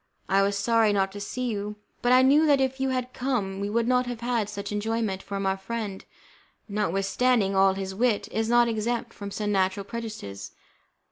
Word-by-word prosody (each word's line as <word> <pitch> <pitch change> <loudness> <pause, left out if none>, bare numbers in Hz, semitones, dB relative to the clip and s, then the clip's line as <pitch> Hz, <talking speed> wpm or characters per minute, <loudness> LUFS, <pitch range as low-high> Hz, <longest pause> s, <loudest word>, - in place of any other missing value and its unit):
I 195 +1 +3
was 200 0 +1
sorry 225 +1 +3
not 195 -1 +1
to 205 - -8
see 250 +5 -3
you, 210 0 -4 0.3
but 245 - +2
I 255 +1 +7
knew 295 +4 +5
that 285 -2 +5
if 265 0 0
you 265 0 +1
had 255 -1 -2
come 225 -7 -2
we 200 +1 -2
would 230 +2 +1
not 250 0 +2
have 240 -1 -5
had 235 -4 -1
much 200 +1 -4
enjoyment; 210 -2 -1
for 200 - -5
our 190 0 +1
friend, 205 -1 -5 0.6
notwithstanding 200 +2 +1
all 190 0 +4
his 190 0 -4
wit, 225 +1 +1
is 220 +1 -1
not 240 0 +5
exempt 230 +1 -2
from 200 -1 -7
some 210 +1 -2
natural 190 0 +1
prejudices. 200 - -7
215 Hz, 195 wpm, -26 LUFS, 195-245 Hz, 0.6 s, I